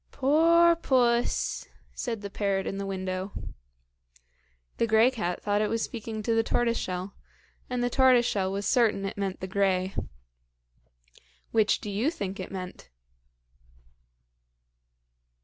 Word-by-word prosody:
"Poor 335 Hz, +5 st, +4 dB
puss!" 245 Hz, -6 st, +1 dB, 0.3 s
said 230 Hz, -4 st, -4 dB
the 200 Hz, -, -6 dB
parrot 195 Hz, -1 st, -1 dB
in 195 Hz, -, -4 dB
the 200 Hz, -, -3 dB
window. 185 Hz, 0 st, -4 dB, 1.4 s
The 230 Hz, -, +1 dB
grey 220 Hz, +3 st, +5 dB
cat 180 Hz, -8 st, -3 dB
thought 205 Hz, 0 st, +1 dB
it 215 Hz, -, 0 dB
was 230 Hz, 0 st, -1 dB
speaking 220 Hz, -2 st, -5 dB
to 230 Hz, -, +1 dB
the 225 Hz, -, +3 dB
tortoiseshell, 200 Hz, -6 st, -1 dB, 0.6 s
and 250 Hz, -1 st, -1 dB
the 245 Hz, -, +1 dB
tortoiseshell 240 Hz, -8 st, +3 dB
was 200 Hz, +1 st, -3 dB
certain 220 Hz, -5 st, +2 dB
it 195 Hz, -, -4 dB
meant 195 Hz, -2 st, -3 dB
the 190 Hz, -, -4 dB
grey. 190 Hz, -1 st, 0 dB, 1.6 s
Which 220 Hz, -2 st, +2 dB
do 210 Hz, -, -5 dB
you 220 Hz, +9 st, +1 dB
think 200 Hz, -, -5 dB
it 185 Hz, -, -6 dB
meant? 180 Hz, -, -7 dB
210 Hz, 130 wpm, -27 LUFS, 195-240 Hz, 1.6 s, grey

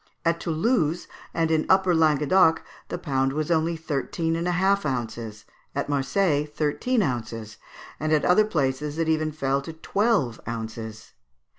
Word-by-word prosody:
At 165 Hz, 0 st, +2 dB
Toulouse 170 Hz, -, 0 dB, 0.2 s
and 165 Hz, -1 st, 0 dB
in 155 Hz, -1 st, +1 dB
Upper 190 Hz, -1 st, +4 dB
Languedoc 160 Hz, +1 st, +4 dB, 0.2 s
the -, -, -4 dB
pound 135 Hz, -3 st, 0 dB
was 155 Hz, +3 st, -2 dB
only 165 Hz, +1 st, +2 dB
thirteen 160 Hz, +2 st, -2 dB
and 170 Hz, +1 st, -2 dB
a -, -, +2 dB
half 195 Hz, +3 st, +2 dB
ounces; 115 Hz, -5 st, -4 dB, 0.3 s
at -, -, -2 dB
Marseilles, 145 Hz, +2 st, +1 dB
thirteen 160 Hz, -, 0 dB
ounces; 115 Hz, -, -4 dB, 0.4 s
and 155 Hz, +1 st, -1 dB
at 155 Hz, -1 st, +3 dB
other 195 Hz, +4 st, +5 dB
places 150 Hz, -4 st, -1 dB
it 165 Hz, -1 st, 0 dB
even 155 Hz, -1 st, +1 dB
fell 140 Hz, -2 st, 0 dB
to 160 Hz, +4 st, -8 dB
twelve 190 Hz, -, 0 dB
ounces. 110 Hz, -1 st, -6 dB
155 Hz, 150 wpm, -25 LUFS, 135-170 Hz, 0.4 s, other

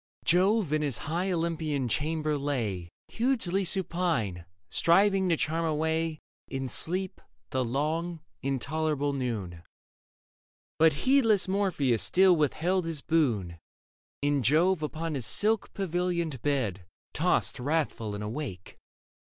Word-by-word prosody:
Jove 185 Hz, -1 st, +3 dB
in 155 Hz, -, +2 dB
his 140 Hz, -5 st, 0 dB
high 175 Hz, +5 st, -2 dB
Olympian 160 Hz, -5 st, -1 dB
chamber 155 Hz, +3 st, 0 dB
lay 115 Hz, -12 st, -2 dB, 0.2 s
Hugely 225 Hz, -6 st, 0 dB
supine, 170 Hz, -, -1 dB, 0.2 s
striving 190 Hz, +2 st, +3 dB
to 165 Hz, -, +3 dB
charm 165 Hz, +3 st, 0 dB
away 160 Hz, 0 st, 0 dB, 0.3 s
In 135 Hz, -1 st, -3 dB
sleep 185 Hz, +9 st, -2 dB, 0.3 s
the 130 Hz, 0 st, +1 dB
long, 155 Hz, +7 st, -1 dB, 0.2 s
intolerable 145 Hz, +2 st, -1 dB
noon. 110 Hz, -11 st, -3 dB, 1.2 s
But 160 Hz, 0 st, +6 dB
heedless 230 Hz, -8 st, +4 dB
Morpheus 180 Hz, -, +1 dB
still 185 Hz, -1 st, +4 dB
withheld 165 Hz, +4 st, +1 dB
his 160 Hz, -4 st, -4 dB
boon, 110 Hz, -, 0 dB, 0.6 s
And 145 Hz, -2 st, +2 dB
Jove 160 Hz, -, +3 dB
upon 160 Hz, +1 st, -3 dB
his 130 Hz, -5 st, -3 dB
silk 220 Hz, 0 st, +1 dB
pavilioned 175 Hz, -, -1 dB
bed 110 Hz, -11 st, -1 dB, 0.3 s
Tossed -, -, +1 dB
wrathful 130 Hz, -7 st, -1 dB
and 105 Hz, -, -5 dB
awake. 105 Hz, -, -6 dB
155 Hz, 115 wpm, -28 LUFS, 135-175 Hz, 1.2 s, But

